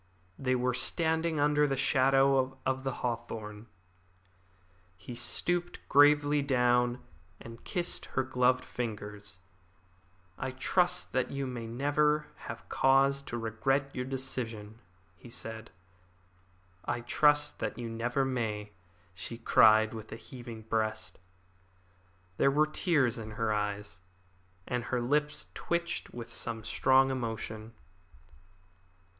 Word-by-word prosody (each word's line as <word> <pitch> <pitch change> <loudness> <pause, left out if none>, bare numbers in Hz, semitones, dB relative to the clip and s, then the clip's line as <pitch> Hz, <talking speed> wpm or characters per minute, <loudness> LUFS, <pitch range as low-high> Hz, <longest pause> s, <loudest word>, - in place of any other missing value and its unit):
They 130 -1 +1
were 125 0 +1
standing 160 +4 +1
under 150 0 +3
the 135 -1 -1
shadow 135 0 +3
of 130 0 0
the 135 - -1
hawthorn. 115 -2 -5 1.3
He 95 +6 -9
stooped 175 +9 0
gravely 145 0 +5
down, 125 -2 +2 0.4
and 115 0 -11
kissed 175 -1 -1
her 130 - +4
glove 125 0 +2
covered - - -15
fingers. 105 -4 -5 1.0
"I 130 - -2
trust 175 +7 +1
that 130 -1 0
you 140 0 -3
may 120 -3 -5
never 150 +5 +1 0.2
have - - -7
cause 135 +1 +3
to 120 -4 -5
regret 135 +5 0
your 125 - -3
decision," 115 -5 -4 0.4
he 120 - -13
said. 110 -1 -7 1.1
"I 120 - -2
trust 150 +4 +3
that - - -3
you 120 -1 -4
never 120 +4 -1
may," 110 -5 -2 0.4
she 95 +5 -7
cried, 110 -2 +5
with 110 -1 -8
a - - -5
heaving 115 -1 -10
breast. 110 -4 -2 1.2
There - - +4
were 150 +3 +3
tears 150 - +1
in 110 -1 -7
her 110 -2 +1
eyes, 105 -1 -3 0.7
and 125 -1 -2
her 125 - -1
lips 150 +5 0
twitched 170 0 -2
with 120 -1 -8
some 115 -2 -2
strong 135 +3 +3
emotion. 110 -3 -4
125 Hz, 120 wpm, -30 LUFS, 115-140 Hz, 1.3 s, gravely